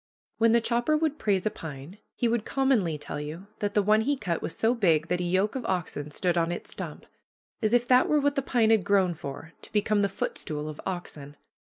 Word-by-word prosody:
When 230 Hz, 0 st, +5 dB
the 235 Hz, -, +4 dB
chopper 240 Hz, +6 st, +1 dB
would 305 Hz, -1 st, -1 dB
praise 195 Hz, -4 st, +1 dB
a 215 Hz, -, +1 dB
pine 155 Hz, +5 st, -9 dB, 0.2 s
he 240 Hz, -, +1 dB
will 235 Hz, +1 st, +2 dB
commonly 225 Hz, -, +1 dB
tell 145 Hz, 0 st, -6 dB
you 155 Hz, +6 st, -7 dB
that 205 Hz, -1 st, -2 dB
the 205 Hz, -, +4 dB
one 215 Hz, +2 st, +4 dB
he 280 Hz, +5 st, 0 dB
cut 170 Hz, -9 st, -2 dB
was -, -, -4 dB
so 225 Hz, +2 st, +3 dB
big 165 Hz, -9 st, +2 dB
that 180 Hz, 0 st, 0 dB
a -, -, -1 dB
yoke 185 Hz, +4 st, +1 dB
of 260 Hz, -, -3 dB
oxen 160 Hz, -5 st, -2 dB
stood 175 Hz, +3 st, 0 dB
on 165 Hz, 0 st, 0 dB
its 175 Hz, -, -5 dB
stump; -, -, -7 dB, 0.6 s
as 215 Hz, -1 st, +1 dB
if 245 Hz, 0 st, +3 dB
that 255 Hz, 0 st, +5 dB
were 300 Hz, -, +4 dB
what 285 Hz, 0 st, +2 dB
the 275 Hz, -, 0 dB
pine 235 Hz, -4 st, +2 dB
had 220 Hz, -4 st, +4 dB
grown 190 Hz, -2 st, +3 dB
for, 160 Hz, +1 st, -8 dB
to -, -, -11 dB
become 210 Hz, 0 st, +2 dB
the 200 Hz, 0 st, +2 dB
footstool 150 Hz, -4 st, -4 dB
of 155 Hz, -1 st, -7 dB
oxen. 150 Hz, -6 st, -6 dB
200 Hz, 230 wpm, -27 LUFS, 165-235 Hz, 0.6 s, When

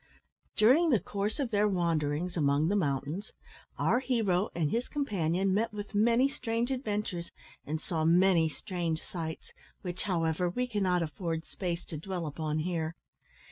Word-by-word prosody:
During 265 Hz, +11 st, +5 dB
the 240 Hz, -8 st, +4 dB
course 205 Hz, +7 st, -3 dB
of 265 Hz, -4 st, -1 dB
their 210 Hz, 0 st, +3 dB
wanderings 170 Hz, -2 st, 0 dB
among 145 Hz, 0 st, +2 dB
the 205 Hz, -, +2 dB
mountains 150 Hz, +3 st, -1 dB, 0.4 s
our 245 Hz, -, +3 dB
hero 220 Hz, -8 st, +1 dB
and 160 Hz, -3 st, 0 dB
his 235 Hz, +2 st, 0 dB
companion 195 Hz, -, 0 dB
met 225 Hz, +3 st, +1 dB
with 205 Hz, 0 st, -7 dB
many 235 Hz, +5 st, +4 dB
strange 240 Hz, -2 st, -2 dB
adventures 210 Hz, -9 st, -2 dB, 0.4 s
and 155 Hz, +2 st, -1 dB
saw 160 Hz, 0 st, -2 dB
many 170 Hz, 0 st, +5 dB
strange 170 Hz, 0 st, -3 dB
sights, 160 Hz, -3 st, -6 dB, 0.3 s
which, 180 Hz, -1 st, -4 dB
however, 175 Hz, -1 st, +1 dB
we 250 Hz, +8 st, -1 dB
cannot 190 Hz, -7 st, +1 dB
afford 160 Hz, +1 st, -3 dB
space 175 Hz, -2 st, -4 dB
to 160 Hz, -, -6 dB
dwell 180 Hz, +2 st, -4 dB
upon 155 Hz, 0 st, -2 dB
here. 160 Hz, 0 st, -2 dB
180 Hz, 150 wpm, -30 LUFS, 160-210 Hz, 0.4 s, During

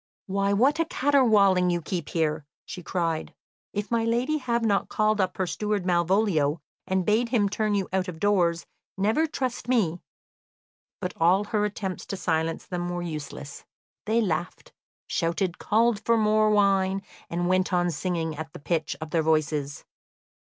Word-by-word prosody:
"Why, 200 Hz, +1 st, 0 dB
what 260 Hz, +10 st, +3 dB
a 330 Hz, -, +2 dB
caterwauling 215 Hz, -, +3 dB
you 175 Hz, -1 st, +1 dB
keep 170 Hz, -1 st, -4 dB
here!" 155 Hz, -3 st, -1 dB, 0.2 s
she 180 Hz, -, -7 dB
cried. 165 Hz, -3 st, -2 dB, 0.4 s
"If 205 Hz, +2 st, -4 dB
my 230 Hz, -1 st, +2 dB
lady 245 Hz, +7 st, 0 dB
have 235 Hz, -3 st, -1 dB
not 200 Hz, -2 st, +1 dB
called 215 Hz, -1 st, +2 dB
up 185 Hz, -1 st, -1 dB
her 185 Hz, -, 0 dB
steward 210 Hz, +1 st, -2 dB
Malvolio 175 Hz, -4 st, +2 dB, 0.3 s
and 190 Hz, -1 st, 0 dB
bade 225 Hz, +3 st, +2 dB
him 225 Hz, -5 st, +2 dB
turn 210 Hz, +1 st, 0 dB
you 195 Hz, -2 st, 0 dB
out 190 Hz, 0 st, 0 dB
of 170 Hz, -3 st, -7 dB
doors, 175 Hz, -4 st, +2 dB, 0.3 s
never 220 Hz, +12 st, +2 dB
trust 255 Hz, -6 st, -3 dB
me." 195 Hz, -9 st, +1 dB, 1.0 s
But 180 Hz, -1 st, -3 dB
all 180 Hz, +5 st, +4 dB
her 210 Hz, 0 st, 0 dB
attempts 195 Hz, -3 st, -4 dB
to 195 Hz, -, -4 dB
silence 160 Hz, -2 st, -1 dB
them 175 Hz, -1 st, -3 dB
were 175 Hz, 0 st, -3 dB
useless. 150 Hz, -3 st, -7 dB, 0.4 s
They 225 Hz, +2 st, +3 dB
laughed, 175 Hz, -4 st, -3 dB, 0.3 s
shouted, 170 Hz, +1 st, -1 dB
called 225 Hz, 0 st, +2 dB
for 230 Hz, 0 st, +3 dB
more 215 Hz, 0 st, +3 dB
wine, 195 Hz, -2 st, +2 dB, 0.3 s
and 175 Hz, +1 st, -1 dB
went 185 Hz, +1 st, +1 dB
on 175 Hz, -1 st, +2 dB
singing 165 Hz, -3 st, -2 dB
at 160 Hz, 0 st, -7 dB
the -, -, -9 dB
pitch 160 Hz, +1 st, -1 dB
of 160 Hz, -1 st, -7 dB
their 165 Hz, -, +2 dB
voices. 150 Hz, -3 st, 0 dB
190 Hz, 165 wpm, -26 LUFS, 170-215 Hz, 1.0 s, all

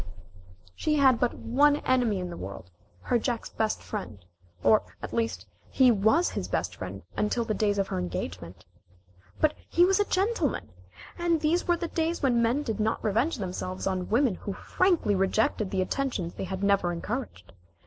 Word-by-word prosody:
She 305 Hz, -, 0 dB
had 265 Hz, -5 st, +5 dB
but 245 Hz, -, +1 dB
one 285 Hz, +5 st, +3 dB
enemy 250 Hz, -7 st, +1 dB
in 180 Hz, -1 st, -4 dB
the -, -, -6 dB
world, 95 Hz, -1 st, -8 dB, 0.3 s
her 240 Hz, -, +1 dB
Jack's 235 Hz, 0 st, -3 dB
best 220 Hz, -1 st, -1 dB
friend, 195 Hz, -, -5 dB, 0.5 s
or 215 Hz, -, +5 dB, 0.2 s
at -, -, -7 dB
least, 230 Hz, -1 st, -1 dB, 0.2 s
he 255 Hz, -2 st, +5 dB
was 220 Hz, -, +3 dB
his -, -, -3 dB
best -, -, -2 dB
friend -, -, -7 dB
until 230 Hz, +3 st, 0 dB
the 220 Hz, -, -1 dB
days 205 Hz, -1 st, +1 dB
of 195 Hz, -1 st, 0 dB
her -, -, -2 dB
engagement. 90 Hz, 0 st, -5 dB, 0.7 s
But 310 Hz, -1 st, +3 dB, 0.2 s
he 350 Hz, -, +5 dB
was 385 Hz, +2 st, +3 dB
a 410 Hz, -, +3 dB
gentleman, 380 Hz, -, 0 dB, 0.5 s
and 340 Hz, -1 st, +2 dB
these 330 Hz, +3 st, +1 dB
were 345 Hz, -1 st, +3 dB
the 340 Hz, 0 st, -3 dB
days 330 Hz, 0 st, -1 dB
when 240 Hz, -3 st, +3 dB
men 240 Hz, +6 st, +1 dB
did 225 Hz, -5 st, -3 dB
not 215 Hz, +1 st, 0 dB
revenge 230 Hz, +9 st, +1 dB
themselves 185 Hz, -2 st, -4 dB
on 185 Hz, -2 st, -2 dB
women 240 Hz, 0 st, +3 dB
who 200 Hz, +2 st, -6 dB
frankly 350 Hz, -, +1 dB
rejected 195 Hz, +1 st, +1 dB
the 190 Hz, -1 st, 0 dB
attentions 210 Hz, -8 st, -2 dB
they -, -, -5 dB
had 190 Hz, +1 st, -4 dB
never 200 Hz, -3 st, +3 dB
encouraged. 175 Hz, -, -5 dB
225 Hz, 180 wpm, -27 LUFS, 190-290 Hz, 0.7 s, had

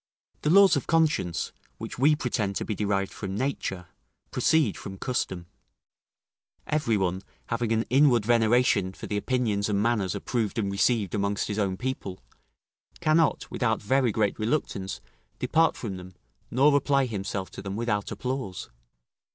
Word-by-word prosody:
The 150 Hz, -, 0 dB
laws 195 Hz, +3 st, +7 dB
of -, -, -2 dB
conscience, 155 Hz, -, +1 dB, 0.3 s
which -, -, -7 dB
we 150 Hz, +3 st, +5 dB
pretend 110 Hz, -8 st, -2 dB
to -, -, -2 dB
be 110 Hz, -, -2 dB
derived 100 Hz, -1 st, -1 dB
from 95 Hz, -2 st, -5 dB
nature, 105 Hz, -8 st, -2 dB, 0.5 s
proceed 155 Hz, -10 st, +2 dB
from 95 Hz, -1 st, -8 dB
custom; 95 Hz, -7 st, -2 dB, 1.2 s
every 130 Hz, -8 st, +1 dB
one, 95 Hz, -1 st, -1 dB, 0.3 s
having 115 Hz, -1 st, -1 dB
an 115 Hz, 0 st, +2 dB
inward 130 Hz, -5 st, +4 dB
veneration 115 Hz, -4 st, +3 dB
for -, -, -9 dB
the 105 Hz, -, -3 dB
opinions 105 Hz, -2 st, 0 dB
and 100 Hz, -1 st, +1 dB
manners 105 Hz, -4 st, +1 dB
approved 115 Hz, -4 st, -2 dB
and 100 Hz, -3 st, 0 dB
received 100 Hz, -1 st, +1 dB
amongst 100 Hz, 0 st, -1 dB
his 105 Hz, +1 st, -2 dB
own 95 Hz, -2 st, 0 dB
people, 125 Hz, -7 st, -4 dB, 0.8 s
cannot, 160 Hz, 0 st, +2 dB
without 110 Hz, -3 st, 0 dB
very 130 Hz, +2 st, +2 dB
great 105 Hz, 0 st, 0 dB
reluctance, 110 Hz, -5 st, -2 dB, 0.4 s
depart 160 Hz, +7 st, +2 dB
from 100 Hz, -6 st, -5 dB
them, 90 Hz, 0 st, -11 dB, 0.3 s
nor 140 Hz, +4 st, +4 dB
apply 140 Hz, -1 st, +3 dB
himself 100 Hz, -4 st, -4 dB
to -, -, -8 dB
them 100 Hz, 0 st, -5 dB
without 105 Hz, -3 st, -1 dB
applause. 125 Hz, -7 st, -4 dB
110 Hz, 150 wpm, -27 LUFS, 100-130 Hz, 1.2 s, laws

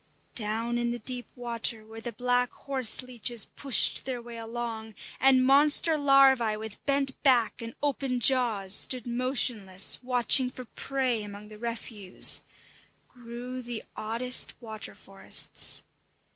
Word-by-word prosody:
Down 230 Hz, +2 st, -3 dB
in 240 Hz, 0 st, -2 dB
the 240 Hz, -, -4 dB
deep 245 Hz, +1 st, -6 dB
water 235 Hz, -2 st, 0 dB
where 225 Hz, +1 st, -12 dB
the 240 Hz, -, -6 dB
black 245 Hz, +2 st, -1 dB
horse 260 Hz, -3 st, +2 dB
leeches 240 Hz, -3 st, 0 dB
pushed 275 Hz, -3 st, +2 dB
their 255 Hz, -2 st, -5 dB
way 235 Hz, -1 st, -10 dB
along, 225 Hz, -1 st, -7 dB, 0.2 s
and 260 Hz, -1 st, +4 dB
monster 295 Hz, +4 st, +4 dB
larvæ 270 Hz, -6 st, +3 dB
with 220 Hz, -1 st, -10 dB
bent 275 Hz, -1 st, -1 dB
back 250 Hz, -4 st, +1 dB
and 230 Hz, 0 st, -9 dB
open 270 Hz, -3 st, -2 dB
jaws 230 Hz, -7 st, +1 dB
stood 250 Hz, +2 st, +2 dB
motionless, 235 Hz, -6 st, 0 dB
watching 250 Hz, +1 st, +3 dB
for 255 Hz, 0 st, -11 dB
prey 255 Hz, -2 st, -3 dB
among 205 Hz, 0 st, -10 dB
the 215 Hz, 0 st, -13 dB
refuse, 225 Hz, -4 st, +1 dB, 0.7 s
grew 245 Hz, +1 st, -9 dB
the 240 Hz, -2 st, -7 dB
oddest 235 Hz, +4 st, +2 dB
water 220 Hz, -3 st, -9 dB
forests. 195 Hz, 0 st, +1 dB
240 Hz, 130 wpm, -27 LUFS, 225-255 Hz, 0.7 s, and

